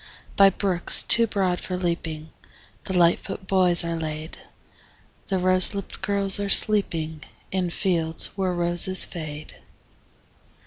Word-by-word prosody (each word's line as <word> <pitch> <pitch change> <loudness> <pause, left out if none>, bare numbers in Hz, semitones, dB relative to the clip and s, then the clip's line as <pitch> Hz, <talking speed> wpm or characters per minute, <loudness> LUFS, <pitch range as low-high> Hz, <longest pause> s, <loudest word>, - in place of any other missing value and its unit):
By 195 0 +4
brooks 185 -2 +1
too 230 0 +3
broad 190 -4 -3
for 185 - -7
leaping 165 -3 -6 0.5
The 190 - -4
lightfoot 175 +2 -1
boys 180 -3 +2
are 170 0 -5
laid; 155 0 -8 0.9
The 190 - -3
rose 185 +1 +1
lipt 200 - -9
girls 200 0 +4
are 200 0 -5
sleeping 165 -8 +2 0.3
In 185 -2 -3
fields 170 -3 -2
where 190 -2 -3
roses 175 +1 +4
fade. 155 -3 -10
180 Hz, 125 wpm, -22 LUFS, 165-195 Hz, 0.9 s, By